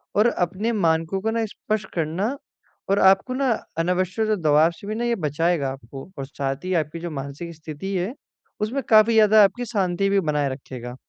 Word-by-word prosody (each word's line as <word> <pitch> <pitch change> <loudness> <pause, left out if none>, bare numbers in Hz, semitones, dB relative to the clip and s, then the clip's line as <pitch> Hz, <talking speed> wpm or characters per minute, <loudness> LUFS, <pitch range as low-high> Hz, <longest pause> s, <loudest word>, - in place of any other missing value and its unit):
और 210 +3 +5
अपने 190 +4 -1
मानकों 165 -3 +1
को 225 +2 0
ना 225 0 0
स्पष्ट 215 -1 -3
करना 175 - -1 0.5
और 200 +1 +3
आपको 195 +6 +4
ना 265 -1 +1 0.3
अनावश्यक 185 +5 0
दबाव 155 +1 +4
से 200 +4 -12
भी 215 - -3
ना 235 - -2
ये 240 0 +1
बचाएगा 160 -3 0
आपको 135 +3 -10
और 135 - -3
साथ 135 0 -3
ही 185 - -1
आपकी 160 0 -1
जो 175 0 -5
मानसिक 140 +4 -6
स्थिति 160 +5 -6
है 185 +6 -1 0.5
उसमें 235 +6 -1
काफ़ी 220 0 +6
ज़्यादा 215 -1 +6
आपकी 245 +5 +1
शांति 195 -4 0
भी 200 0 +3
बनाए 150 -5 0
रखेगा। 125 -2 -7
180 Hz, 185 wpm, -23 LUFS, 155-215 Hz, 0.5 s, काफ़ी